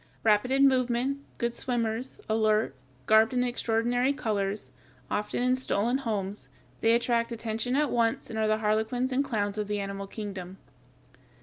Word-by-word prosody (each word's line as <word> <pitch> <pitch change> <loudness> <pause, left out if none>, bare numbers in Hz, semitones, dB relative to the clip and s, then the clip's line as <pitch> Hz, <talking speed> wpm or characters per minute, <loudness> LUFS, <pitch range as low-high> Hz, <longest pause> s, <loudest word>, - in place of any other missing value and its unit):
Rapid 215 +2 +3
in 275 +1 +5
movement, 255 +1 +1 0.2
good 235 0 -1
swimmers, 240 0 -2
alert, 215 0 +2 0.3
garbed 220 +3 +5
in 250 - +3
extraordinary 245 +2 +1
colors, 205 - -2 0.4
often 210 +3 -1
in 255 0 +3
stolen 250 0 0
homes, 205 - -3 0.3
they 225 0 +4
attract 235 0 +1
attention 230 +2 -2
at 295 0 +2
once 230 -1 +1
and 220 - -4
are 220 - +2
the 215 0 +2
harlequins 220 +4 0
and 265 +2 +2
clowns 205 -5 -2
of 210 - -2
the 210 0 -1
animal 195 0 -4
kingdom. 195 -3 -7
225 Hz, 150 wpm, -28 LUFS, 210-250 Hz, 0.4 s, in